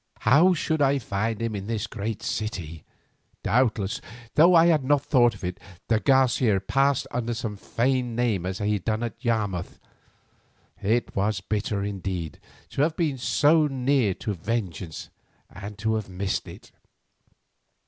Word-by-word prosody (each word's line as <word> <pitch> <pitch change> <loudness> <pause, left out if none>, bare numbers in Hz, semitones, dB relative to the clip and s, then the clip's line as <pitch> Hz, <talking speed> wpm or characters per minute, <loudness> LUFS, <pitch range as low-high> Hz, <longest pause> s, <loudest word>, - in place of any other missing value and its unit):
How 175 +7 +5
should 160 -1 -1
I 140 0 +4
find 110 -2 -2
him 115 -2 -2
in 100 0 -5
this 110 -1 -2
great 110 0 -5
city? 85 -8 -4 0.6
Doubtless, 110 -2 +1 0.3
though 175 +4 +6
I 165 0 +7
had 160 -5 +3
not 145 +1 +2
thought 120 -5 +4
of 95 - -14
it, 90 0 -4 0.3
de 110 -2 +3
Garcia 130 -5 +3
passed 135 +7 +1
under 120 -1 -2
some 110 -3 -4
feigned 125 +3 -1
name 115 -7 0
as 95 0 -3
he 105 0 0
had 100 -4 -3
done 110 +1 0
at 120 +1 -6
Yarmouth. 105 -7 -1 1.0
It 115 +4 0
was 100 0 0
bitter 105 0 -2
indeed 95 -4 -4 0.3
to - - -2
have 155 +2 +1
been 150 -6 0
so 150 +5 +3
near 130 -6 +1
to 105 - -3
vengeance 95 -4 -4 0.4
and 100 +2 -8
to 110 +1 0
have 110 -3 -3
missed 95 +1 -2
it. - - -12
115 Hz, 155 wpm, -25 LUFS, 100-130 Hz, 1.0 s, I